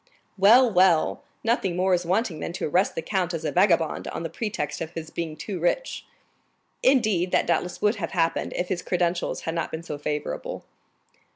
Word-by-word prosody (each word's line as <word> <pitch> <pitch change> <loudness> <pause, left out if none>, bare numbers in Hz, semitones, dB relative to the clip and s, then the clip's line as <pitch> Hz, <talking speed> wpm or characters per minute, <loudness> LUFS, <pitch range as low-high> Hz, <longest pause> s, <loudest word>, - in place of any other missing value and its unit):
"Well, 225 +4 +6
well! 180 -3 +3 0.2
Nothing 220 -6 +1
more 185 +1 +2
is 175 -1 0
wanting 185 -3 0
than 170 - -4
to - - -3
arrest 180 +6 +1
the 165 - -3
count 180 -1 -1
as 160 -1 -5
a - - 0
vagabond, 175 -4 +2
on - - -5
the 165 - -4
pretext 200 -10 -3
of 160 - -3
his 160 -1 -7
being 160 -2 -4
too 195 -4 -5
rich." 340 - -1 0.7
"Indeed, 215 -9 +3
that - - +3
doubtless 180 - -1
would 210 +1 +3
have 165 -5 -4
happened 165 -2 0
if 180 - -2
his 180 -2 -1
credentials 175 -1 -1
had 165 - -3
not 165 -1 -2
been 160 +1 -6
so 150 -3 -6
favorable." 150 0 -4
175 Hz, 190 wpm, -25 LUFS, 165-195 Hz, 0.7 s, Well